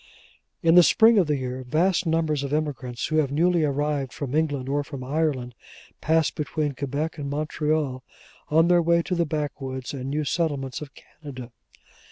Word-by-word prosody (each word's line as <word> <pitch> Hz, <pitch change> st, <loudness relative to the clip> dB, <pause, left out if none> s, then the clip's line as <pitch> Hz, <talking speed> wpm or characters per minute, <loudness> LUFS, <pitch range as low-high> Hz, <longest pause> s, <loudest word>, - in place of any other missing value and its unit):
In 165 Hz, 0 st, +5 dB
the 180 Hz, -, +9 dB
spring 225 Hz, +5 st, +5 dB
of 180 Hz, -, +2 dB
the 150 Hz, -1 st, +1 dB
year, 130 Hz, 0 st, -4 dB
vast 170 Hz, +7 st, +1 dB
numbers 160 Hz, -3 st, +1 dB
of 140 Hz, -1 st, -4 dB
emigrants 135 Hz, -5 st, -2 dB
who 155 Hz, -, -1 dB
have 145 Hz, -3 st, +2 dB
newly 170 Hz, +3 st, +2 dB
arrived 145 Hz, -2 st, -1 dB
from 140 Hz, -3 st, -5 dB
England 145 Hz, -4 st, 0 dB
or 145 Hz, +1 st, 0 dB
from 140 Hz, -3 st, -8 dB
Ireland, 135 Hz, -3 st, -1 dB, 0.5 s
pass 160 Hz, 0 st, +2 dB
between 150 Hz, 0 st, -2 dB
Quebec 145 Hz, +4 st, -3 dB
and 140 Hz, -1 st, -4 dB
Montreal 150 Hz, -2 st, -1 dB, 0.5 s
on 160 Hz, +2 st, +4 dB
their 175 Hz, 0 st, +5 dB
way 170 Hz, 0 st, +2 dB
to 180 Hz, -, -3 dB
the 170 Hz, -2 st, +1 dB
backwoods 135 Hz, -4 st, -4 dB
and 135 Hz, -1 st, -5 dB
new 150 Hz, +2 st, -1 dB
settlements 145 Hz, -4 st, -2 dB
of 150 Hz, -, -7 dB
Canada. 130 Hz, -5 st, -11 dB
150 Hz, 175 wpm, -25 LUFS, 135-160 Hz, 0.5 s, the